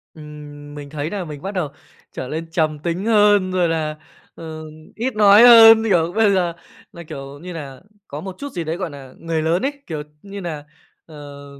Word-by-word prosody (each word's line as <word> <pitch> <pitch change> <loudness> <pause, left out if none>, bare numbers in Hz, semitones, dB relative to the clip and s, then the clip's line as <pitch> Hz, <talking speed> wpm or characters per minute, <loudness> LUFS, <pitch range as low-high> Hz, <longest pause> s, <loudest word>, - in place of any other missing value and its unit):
Ừm, 150 -1 -11
mình 145 -1 -9
thấy 150 +1 -4
nà 195 -1 -4
mình 150 -3 -9
bắt 195 - -5
đầu 180 -7 -2 0.4
trở 130 - -6
lên 160 +4 -5
trầm 155 -3 0
tính 170 +5 -3
hơn, 205 -4 +4
rồi 180 -2 +1
là, 155 -2 -2 0.4
ờ, 160 -1 -8 0.3
ít 245 +2 -3
nói 205 0 +7
hơn. 225 -2 +9
Kiểu, 175 -6 +1
bây 220 -2 +4
giờ 175 -3 0 0.4
là, 170 - -10
kiểu 140 -2 -9
như 180 +3 -8
là, 140 -5 -8 0.3
có 145 +2 -7
một 190 +1 -7
chút 285 0 -6
gì 175 -6 -4
đấy, 160 +1 -3
gọi 185 -2 -4
nà, 135 -3 -12
người 165 -1 -2
lớn 165 +3 +1
ấy, 285 - -1
kiểu 155 -3 -5 0.2
như 200 0 -9
nà, 155 -5 -6 0.4
ờ, 145 -2 -11
165 Hz, 200 wpm, -20 LUFS, 150-195 Hz, 0.4 s, hơn